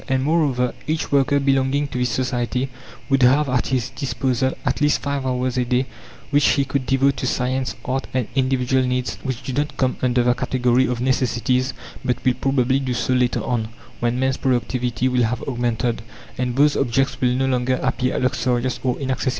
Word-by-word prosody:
And, 130 0 +1
moreover, 140 -5 +1
each 155 +1 -2
worker 140 0 +3
belonging 135 +1 +1
to 125 - -4
this 125 0 +1
society 125 +1 -1 0.4
would 135 -1 +2
have 135 +4 +5
at 125 -2 0
his 125 -1 -1
disposal 130 -1 -1
at - - 0
least 145 0 +2
5 140 -2 -2
hours 125 0 -1
a - - +2
day 125 +2 +1 0.5
which 145 0 +3
he 140 -2 +1
could 130 -1 -2
devote 135 +2 +2
to 130 - -2
science, 130 +1 -1
art, 135 -1 -2
and 130 -4 -1
individual 130 -1 +1
needs 125 0 -2
which 130 -1 -4
do 130 - -4
not 145 +3 -2
come 130 -1 0
under 125 -1 +2
the 125 0 +3
category 125 0 +1
of 125 -1 -2
necessities, 125 0 0 0.3
but 125 +1 -2
will 130 - +4
probably 135 0 +1
do 130 -2 -2
so 125 +1 0
later 125 -1 +1
on, 115 -4 -1 0.3
when 120 0 0
man's 130 0 +1
productivity 125 -1 0
will 125 -1 +1
have 115 +1 0
augmented, 120 -2 -1 0.3
and 125 -1 -2
those 145 +2 +4
objects 135 +1 0
will 125 -1 +2
no 135 +1 +1
longer 130 -1 +1
appear 130 -1 0
luxurious 125 -1 0
or 125 -2 0
inaccessible. 130 -1 -1
130 Hz, 190 wpm, -21 LUFS, 125-135 Hz, 0.5 s, have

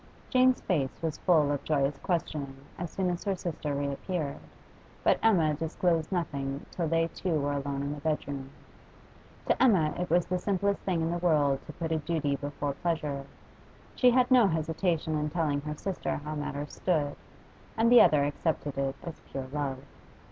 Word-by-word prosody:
Jane's 255 -1 +4
face 135 -3 -1
was 160 -2 -2
full 155 -5 +4
of 145 - -2
joyous 140 -2 0
questioning 150 -6 -2 0.2
as 175 -1 -3
soon 185 0 -1
as 175 - -4
her 200 -2 0
sister 160 -5 -3
reappeared, 140 +2 -3 0.6
but - - +4
Emma 170 -9 +4
disclosed 165 +1 0
nothing 140 -6 -2
till 170 -3 -2
they 165 +1 +2
two 165 -2 -1
were 145 0 0
alone 140 0 -2
in 140 +1 -2
the 145 - -8
bed 155 -1 -1
room. 135 -2 -5 1.0
To - - +1
Emma 190 -12 +4
it 180 - -2
was 175 +1 +3
the 180 0 -1
simplest 200 +1 0
thing 175 -4 0
in 165 - 0
the 175 - -1
world 145 -6 +2
to 155 - -8
put 165 0 -4
a 160 - +1
duty 150 -2 -1
before 145 0 -3
pleasure; 145 -4 -2 0.7
she 250 - +5
had 250 +1 +3
no 245 -5 +7
hesitation 160 0 0
in 150 0 -1
telling 150 -3 0
her 150 +1 -4
sister 195 +2 -2
how 150 +1 -5
matters 145 -1 -4
stood. 150 -6 0 0.6
And 230 +1 +4
the 245 - +10
other 145 -2 +5
accepted 145 -1 -2
it 135 0 -1
as 170 - -8
pure 135 -1 -4
love. 140 -3 -1
155 Hz, 180 wpm, -29 LUFS, 145-175 Hz, 1.0 s, the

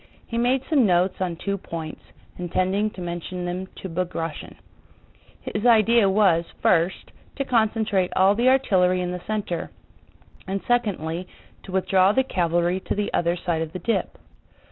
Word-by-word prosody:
He 230 - -7
made 245 +3 +2
some 280 -8 +3
notes 180 +1 +1
on 180 -2 -1
two 200 +3 -3
points, 160 -3 -7 0.4
intending 185 +4 0
to 190 - -10
mention 175 +1 -5
them 180 +2 -4 0.2
to - - -3
Bagratión. 165 -2 -4 1.0
His 210 - -2
idea 230 -2 +5
was, 190 -4 +3 0.2
first, 175 +1 +1 0.2
to 275 - -2
concentrate 220 -5 +1
all 190 +2 +5
the 240 +4 +3
artillery 185 -9 +3
in 180 0 -2
the 180 0 -5
center, 205 -6 -3 0.8
and 195 +1 -2
secondly, 185 -8 -1 0.3
to - - -11
withdraw 190 +1 +3
the 265 - +3
cavalry 175 -4 0
to - - -4
the 205 0 -2
other 170 0 +1
side 170 -2 -2
of 160 0 -4
the - - -3
dip. 225 +6 -2
185 Hz, 155 wpm, -24 LUFS, 175-215 Hz, 1.0 s, idea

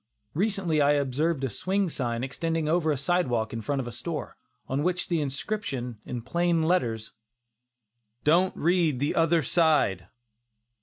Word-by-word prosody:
Recently 190 -4 +1
I 145 +1 +5
observed 145 +2 0
a 135 - 0
swing 195 - 0
sign 120 -6 -2
extending 160 +4 -2
over 160 0 +2
the 145 - 0
sidewalk 130 -8 0
in 115 - -3
front 140 +6 -1
of 125 - -6
a - - -5
store, 150 +6 -5 0.3
on 135 +2 -1
which 180 +2 +1
was - - -3
the 170 -3 0
inscription, 135 - -3
in 120 -2 -4
plain 170 +4 +1
letters, 115 -11 0 1.1
"DON'T 175 +5 +3
READ 165 -5 +2
THE 145 +2 0
OTHER 165 0 +3
SIDE." 135 - +2
155 Hz, 155 wpm, -27 LUFS, 130-170 Hz, 1.1 s, I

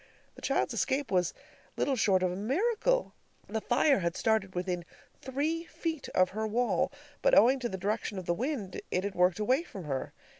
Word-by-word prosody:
The - - -14
child's - - 0
escape 275 +1 0
was 180 -3 +2 0.5
little 275 - +1
short 195 -6 +3
of 180 - +2
a - - -4
miracle. 430 - +1 0.3
The 220 +1 -2
fire 270 +2 +3
had 170 -1 -1
started 220 -4 +1
within 180 -1 -2 0.4
three 310 +6 -1
feet 325 -4 -4
of 185 0 +4
her 220 +2 -2
wall, 240 +3 +1 0.3
but - - +5
owing 260 +3 +6
to 240 -2 -2
the 190 - -4
direction 205 +2 -2
of 185 - -5
the 175 - +1
wind, 225 - -3
it 185 - 0
had 200 0 -2
worked 180 -1 +3
away 255 +8 +2
from 200 - -9
her. 135 -4 -3
220 Hz, 190 wpm, -30 LUFS, 185-275 Hz, 0.5 s, owing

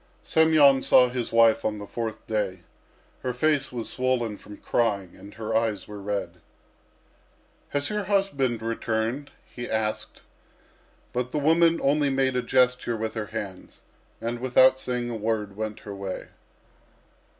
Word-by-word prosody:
Semyon 155 -4 +5
saw 125 -1 +5
his 125 -2 -3
wife 115 -1 +5
on 105 -1 -1
the 105 - -7
fourth 115 +1 -5
day. 100 -4 -2 0.6
Her 125 - -2
face 145 +2 +1
was 120 -2 -4
swollen 125 -4 -1
from 105 0 -12
crying 100 -6 -1
and 100 - -13
her 110 0 -3
eyes 110 -3 0
were 105 -1 -8
red. 100 0 -4 1.3
"Has 145 +4 -1
your 210 -1 -2
husband 140 - 0
returned?" 115 +4 -2 0.2
he 120 0 -8
asked. 110 -1 -2 0.9
But 125 0 -2
the - - -2
woman 165 +3 +4
only 145 +1 +3
made 135 -1 +1
a 125 - +1
gesture 125 -2 +2
with 110 0 -3
her 110 -2 -4
hands, 100 -4 -7 0.4
and 120 +1 -3
without 130 +1 +5
saying 125 -2 -2
a - - -3
word 105 -2 -2
went 110 0 -5
her 100 - -8
way. 100 -1 -6
120 Hz, 150 wpm, -26 LUFS, 110-130 Hz, 1.3 s, Semyon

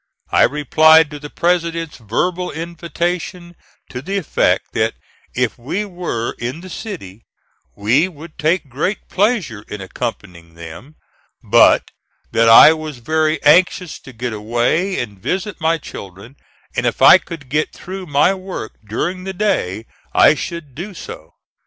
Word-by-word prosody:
I - - +4
replied 155 +2 +4
to 145 - -7
the 150 0 -9
President's 170 -2 -1
verbal 175 - -2
invitation 170 +1 -4 0.4
to 125 - -5
the 195 +8 -3
effect, 185 - 0
that - - 0 0.4
if 125 -1 -1
we 180 - -3
were 175 - -4
in 125 +7 -4
the 185 0 -10
city 155 - -8 0.5
we 120 - +2
would 165 -2 -13
take 160 +1 +1
great 145 - -3
pleasure 190 - 0
in 105 - -7
accompanying 95 -5 -6
them; 85 - -11 0.5
but - - +4 0.4
that 115 0 +3
I 115 +7 +9
was 155 -3 -7
very 155 +4 0
anxious 175 +2 +3
to 130 - -13
get 120 0 -4
away 120 - 0
and 100 -5 -6
visit 190 - -3
my 165 +1 +2
children, 100 - -11 0.4
and - - 0
if - - -1
I - - +9
could 160 -5 -10
get 150 +4 -1
through 185 0 -8
my 145 +6 +3
work 185 -11 -6
during 175 - -3
the 190 0 -5
day 115 - -1 0.3
I - - +7
should 155 -3 -6
do 185 +8 -7
so. - - -10
155 Hz, 145 wpm, -18 LUFS, 120-180 Hz, 0.5 s, I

